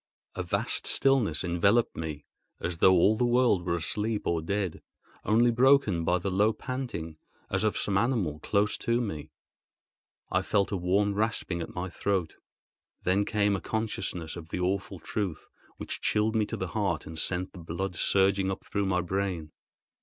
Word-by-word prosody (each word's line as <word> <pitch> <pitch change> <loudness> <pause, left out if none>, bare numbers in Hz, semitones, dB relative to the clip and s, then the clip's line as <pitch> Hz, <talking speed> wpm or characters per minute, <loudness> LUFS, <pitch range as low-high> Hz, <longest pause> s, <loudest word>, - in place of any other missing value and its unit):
A - - -3
vast - - -1
stillness 125 - +3
enveloped 100 +7 +2
me, 75 -2 -5 0.3
as 85 -1 -4
though 95 - +6
all 95 +4 +5
the 125 - 0
world 120 -6 +3
were 85 -1 0
asleep 105 +6 -1
or 85 -1 0
dead—only 105 +5 -1
broken 120 -8 +4
by 90 +2 +2
the 95 +2 -3
low 105 +4 +3
panting 120 -14 -5 0.3
as 95 +1 +1
of 110 - +1
some 100 -1 +1
animal 105 - 0
close 100 +6 +1
to 115 +1 +1
me. 90 -11 -4 1.0
I - - +2
felt 100 -2 +1
a - - 0
warm 100 +3 +1
rasping 100 -4 -1
at 80 - -7
my 90 +1 -3
throat, 95 -2 -2 0.7
then 95 +3 +2
came 105 -2 +1
a 95 - -4
consciousness 105 -7 -3
of 85 -2 -9
the 90 - -3
awful 95 +2 -1
truth, 90 -1 -4 0.3
which - - -5
chilled 110 +1 +1
me 110 -2 +2
to - - -4
the 95 - -3
heart 95 -5 -1
and 80 0 -7
sent 90 +2 -2
the 90 - -10
blood 85 +3 -4
surging 95 +2 +2
up 95 - -4
through 100 -1 -1
my 90 -1 +1
brain. 90 -3 -2
95 Hz, 170 wpm, -28 LUFS, 85-105 Hz, 1.0 s, though